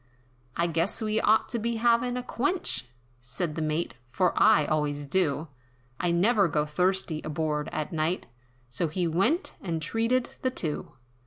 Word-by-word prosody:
"I 170 - +1
guess 170 +3 0
that 220 - -2
we 215 +1 +1
ought 220 +1 +4
to 235 - -2
be 230 +1 -1
havin' 235 +2 +2
a 250 - -3
quench," 285 - -1 0.3
Said 135 +7 -4
the 160 - -3
Mate, 155 +2 -1 0.2
"For 180 +8 +1
I 150 - +5
always 145 -1 -1
do, 155 -1 0 0.5
I 175 - +1
never 195 +4 +4
go 150 -1 0
thirsty, 180 0 0
aboard 150 -1 -2
at 155 +4 -3
night," 160 +3 0 0.4
So 125 +8 -1
he 175 +3 -1
went, 215 - +1
and 170 -4 -2
treated 230 +10 0
the 255 - +1
two. 160 -12 -4
170 Hz, 165 wpm, -28 LUFS, 155-220 Hz, 0.5 s, I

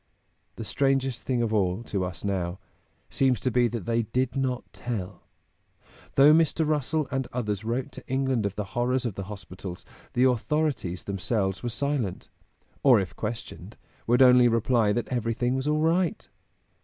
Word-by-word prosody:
The 115 - -6
strangest 135 +3 0
thing 125 -2 0
of 110 -1 -1
all, 95 0 +1
to 100 -5 -2
us 90 -1 -5
now, 95 -3 -2 0.5
seems 130 -4 +2
to 130 - 0
be 120 0 +3
that 115 -5 -5
they 115 0 +1
did 125 +4 -1
not 130 -2 -1
tell. 100 -6 -5 0.9
Though 145 +2 +7
Mr. 160 -1 +3
Russell 150 0 0
and 135 -2 -1
others 105 -5 -2
wrote 125 +5 -2
to - - -11
England 130 -5 0
of 100 - -6
the 105 - -2
horrors 125 +1 0
of 115 - -1
the 100 0 -6
hospitals, 95 -3 -8 0.3
the 125 - +2
authorities 130 - 0
themselves 95 0 -1
were 120 - -2
silent, 125 -4 -2 0.5
or 130 -5 +6
if 95 -3 -4
questioned, 110 +1 -6 0.3
would 120 +3 +5
only 125 -1 +7
reply 115 -1 +2
that 120 +3 -1
everything 120 0 0
was 130 +2 -2
"all 150 0 +2
right." 175 +5 +1
120 Hz, 165 wpm, -27 LUFS, 105-135 Hz, 0.9 s, Though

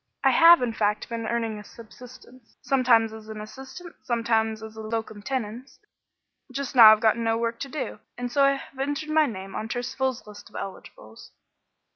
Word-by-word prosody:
I - - +5
have, 335 -3 +7
in 235 -2 -1
fact, 210 -1 -1
been 230 -1 -4
earning 225 -2 -2
a - - -10
subsistence, 245 +2 -15
sometimes 240 -5 +3
as 220 0 -11
an 215 -1 -7
assistant, 265 +11 -10
sometimes 225 -2 0
as 220 0 -10
a 220 - -8
locum 220 -1 -5
tenens. 250 +1 -5 0.7
Just 275 +1 -4
now 225 -3 +10
I've 215 - +4
got 220 0 +3
no 225 -1 0
work 230 0 -2
to 275 - -5
do, 300 +1 -5 0.2
and 245 0 -4
so 275 +2 +4
have 270 0 -11
entered 290 +3 -3
my 310 -1 +4
name 195 -3 -7
on 220 - -4
Turcival's 250 +2 -3
list 205 -1 -13
of - - -21
eligibles." 110 - -9
230 Hz, 180 wpm, -25 LUFS, 220-260 Hz, 0.7 s, now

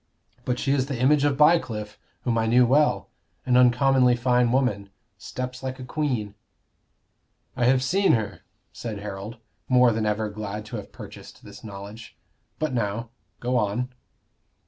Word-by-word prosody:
But 125 -1 -1
she 135 - -1
is 135 -2 +1
the 135 -4 -4
image 140 +3 +4
of 145 -2 +2
Bycliffe, 125 -10 +2 0.2
whom 120 - 0
I 115 -1 +1
knew 125 +2 +5
well 145 +5 +2 0.4
an 125 - +2
uncommonly 125 0 +4
fine 125 0 +2
woman 120 -7 0 0.3
steps 125 +4 -6
like 130 -1 -4
a 130 - -8
queen." 125 -7 -2 1.2
"I 125 -2 +1
have 130 +1 +3
seen 195 +9 +3
her," 110 -3 -2 0.3
said 110 -3 -6
Harold, 105 +2 -7 0.3
more 125 -1 +5
than 110 -1 -1
ever 105 +1 0
glad 105 0 -6
to 115 +2 -6
have 105 - -9
purchased - - -12
this - - -12
knowledge. 105 +2 -10 0.4
"But 155 -3 -2
now, 115 0 -2 0.3
go 125 +1 0
on." 110 +3 -1
125 Hz, 155 wpm, -25 LUFS, 110-130 Hz, 1.2 s, knew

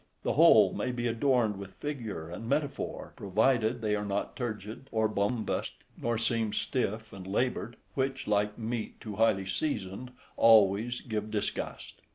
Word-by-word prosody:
The - - +1
whole - - +7
may 125 - -1
be 120 -1 -3
adorned 115 -3 +2
with 100 -1 -9
figure 115 - -5
and 100 +7 -7
metaphor, 145 +1 -2
provided 110 +3 +1
they 105 -1 +1
are 105 - -2
not 100 0 -2
turgid 110 +1 -5
or 110 -1 +2
bombast, 110 +2 -1 0.2
nor 120 -1 -1
seem 115 -1 0
stiff 110 -4 -2
and 95 -1 -9
laboured, 120 +3 -1 0.2
which, 135 0 -1
like 105 0 +1
meat 115 0 -4
too 105 -3 -7
highly 110 -4 +3
seasoned, 95 +1 -3 0.3
always 110 +2 +5
give 110 -2 -3
disgust. 105 -1 -4
110 Hz, 150 wpm, -30 LUFS, 105-120 Hz, 0.3 s, whole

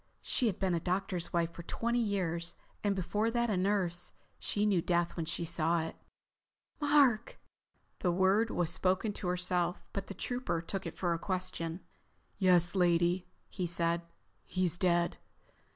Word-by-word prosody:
She 245 - +2
had 195 - 0
been 190 -2 +1
a 170 - +1
doctor's 180 0 -1
wife 170 -1 +1
for 170 - -8
twenty 235 +7 -1
years, 175 -6 -1 0.3
and 205 -1 +2
before 205 +4 0
that 235 -1 +1
a - - +2
nurse. 180 -2 0 0.3
She 205 0 0
knew 195 -5 +3
death 175 0 +1
when 165 -2 -3
she 170 0 -1
saw 165 +1 +1
it. 160 - -6 0.8
"Mark." 285 -6 +3 0.6
The 180 - +2
word 190 +5 +3
was 175 -6 0
spoken 190 +3 +1
to 195 - -5
herself, 180 0 0
but 195 -1 -3
the 195 - -7
Trooper 245 -9 -2
took 190 +3 -3
it - - -8
for 175 -2 +1
a 165 - -2
question. 180 -2 -3 0.6
"Yes, 180 -3 +4
lady," 175 0 +2 0.2
he 180 -2 -3
said. 170 0 +1 0.4
"He's 180 -2 +1
dead. 175 -2 +2
180 Hz, 160 wpm, -32 LUFS, 170-200 Hz, 0.8 s, Yes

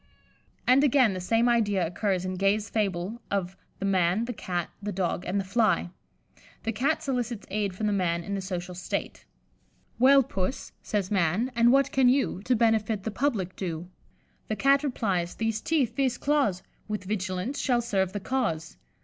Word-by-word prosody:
And, 255 +3 +5
again, 260 -6 +4
the 185 - -4
same 225 +6 +2
idea 205 -6 +2
occurs 185 +2 -1
in 185 - -2
Gay's 195 +3 +1
fable 200 +1 -1
of 190 -2 -2 0.2
the 195 - -4
"Man, 190 +2 +2
the 245 - -4
Cat, 175 -5 -3
the 205 0 -3
Dog, 180 -1 -1
and 195 +3 0
the - - -1
Fly." 195 -3 +1 0.7
The 225 - -1
Cat 280 +8 0
solicits 245 -6 -2
aid 200 -2 -1
from 215 - -3
the 210 - +1
Man 170 -3 0
in 200 - -5
the 195 - -2
social 180 -1 -5
state. 180 0 -4 0.7
"'Well, 270 +2 +7
Puss,' 195 -1 -3
says 205 -2 -2
Man, 195 +6 +1
'and 235 +1 +5
what 275 0 +3
can 260 -2 +4
you 260 -8 +1
To 250 - +3
benefit 220 -2 +1
the 220 - -3
public 205 -6 -1
do?' 175 -2 -5 0.6
The 215 - -1
Cat 275 +4 +3
replies, 195 -11 -1
'These 225 -1 -1
teeth, 270 -8 0
these 265 -2 +1
claws, 275 -11 +1 0.2
With 210 -2 -3
vigilance 190 +5 -3
shall 245 -3 +2
serve 190 -5 0
the 205 - -3
cause. 190 -9 -2
210 Hz, 175 wpm, -27 LUFS, 185-240 Hz, 0.7 s, Well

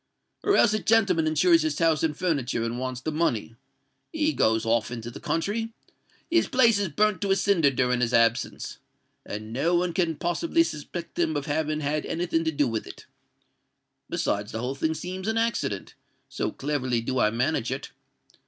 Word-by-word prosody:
Or 405 - +3
else 215 - +5
a 215 - +1
gentleman 200 -7 +3
insures 165 +2 +4
his 155 -2 -1
house 165 -3 +2
and 160 -2 0
furniture, 140 -10 0
and 115 +1 -3
wants 130 -1 -4
the 155 - -2
money: 125 -8 -1 0.6
he 310 -1 +1
goes 110 0 +2
off 115 -1 +1
into 120 -1 -6
the - - -9
country—his 225 - -3
place 230 -5 +4
is 200 - 0
burnt 210 +7 +1
to 200 - -1
a 195 - +4
cinder 195 -6 +3
during 125 -2 +1
his 120 -1 +1
absence—and 115 -2 -2
no 160 +8 +1
one 175 0 +1
can 170 -3 0
possibly 325 - +1
suspect 170 - -6
him 160 -3 +1
of 145 - -3
having 155 0 -1
had 150 +1 -1
any 175 +2 -2
thing 165 -2 0
to 160 - +1
do 145 -2 +1
with 115 -2 -3
it. - - -11 1.0
Besides, 105 +1 -1
the 110 - -4
whole 125 +3 -2
thing 160 +3 -1
seems 185 +4 -5
an 220 0 0
accident—so 225 - -3
cleverly 130 -4 -1
do 130 +2 -2
I 105 - +4
manage 120 +2 0
it. 135 +2 -5
155 Hz, 180 wpm, -26 LUFS, 125-180 Hz, 1.0 s, else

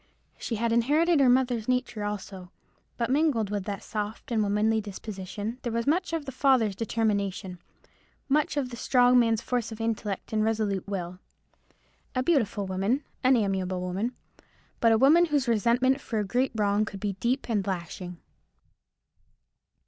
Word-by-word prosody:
She 230 - -3
had 230 +1 0
inherited 295 +8 +3
her 265 -2 +5
mother's 245 -3 +2
nature 250 -4 -1
also: 200 -3 -5 0.5
but 235 +1 -1
mingled 270 -8 +1
with 205 -2 -2
that 200 -1 -5
soft 215 +2 -5
and 225 -2 +2
womanly 210 +2 +1
disposition 205 +2 -6
there 240 - -3
was 230 0 -1
much 345 +5 +1
of 325 -3 -2
the 270 - -5
father's 255 -6 +2
determination, 200 -5 -2 0.7
much 295 +1 +1
of 260 -3 -1
the 235 - -7
strong 250 0 +4
man's 225 -2 +2
force 245 -3 -2
of 220 - -8
intellect 220 -3 -3
and 215 0 +2
resolute 215 -4 -1
will. 180 -2 -4 1.0
A 255 - +1
beautiful 230 -10 +1
woman—an 240 +7 0
amiable 190 -3 -1
woman; 190 +7 -3 0.6
but 230 - +4
a 225 - +5
woman 310 +8 +6
whose 290 -5 0
resentment 240 +4 +2
for 225 - -4
a 210 - 0
great 250 +6 0
wrong 205 -1 +2
could 200 -2 -6
be 200 0 -2
deep 250 +6 0
and 205 -4 -1
lasting. 180 -1 -5
225 Hz, 155 wpm, -27 LUFS, 200-255 Hz, 1.0 s, woman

